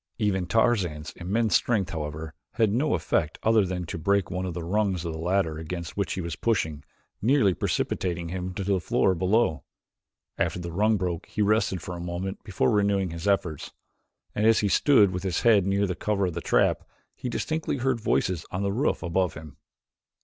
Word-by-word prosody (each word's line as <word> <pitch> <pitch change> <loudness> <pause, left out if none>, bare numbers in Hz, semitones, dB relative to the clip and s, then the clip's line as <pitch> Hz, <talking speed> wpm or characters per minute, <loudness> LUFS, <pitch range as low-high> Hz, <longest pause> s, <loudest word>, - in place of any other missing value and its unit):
Even 95 -5 0
Tarzan's 95 -9 +1
immense 105 +5 0
strength, 105 -7 +1
however, 80 0 -5 0.2
had 110 -3 +2
no 135 +8 +1
effect 80 -2 -1
other 110 -1 +4
than 90 -1 -3
to 85 - -5
break 100 +3 +1
one 90 +1 -2
of 85 - -5
the 85 - -4
rungs 95 -1 0
of 85 - -3
the 80 - -6
ladder 85 -2 0
against 85 +1 -6
which 100 -2 -1
he 95 - -3
was 85 -1 -4
pushing, 80 -10 -1 0.4
nearly 110 -3 +4
precipitating 85 -1 -2
him 90 +1 -4
to 100 - -3
the 95 0 +1
floor 95 +2 +2
below. 95 - +1 0.8
After - - 0
the 85 -1 -5
rung 105 +5 +2
broke 90 -3 -3
he 105 - -1
rested 105 -3 +1
for 90 -3 -5
a - - -7
moment 90 +3 -5
before 100 +4 0
renewing 100 -3 +1
his 85 +4 -5
efforts, 85 -7 -1 0.6
and 105 +1 +2
as 115 - +5
he 105 - +1
stood 105 -3 +5
with 90 0 -3
his 95 -2 -1
head 105 -5 +4
near 100 +1 +2
the 95 - -1
cover 100 +2 0
of 90 - -2
the 85 - -4
trap, - - +2 0.3
he 125 - -5
distinctly 155 +4 -2
heard 130 -1 0
voices 90 -5 0
on 95 +2 -3
the 100 0 0
roof 135 +8 0
above 90 -1 0
him. 75 -1 -10
95 Hz, 195 wpm, -26 LUFS, 85-105 Hz, 0.8 s, as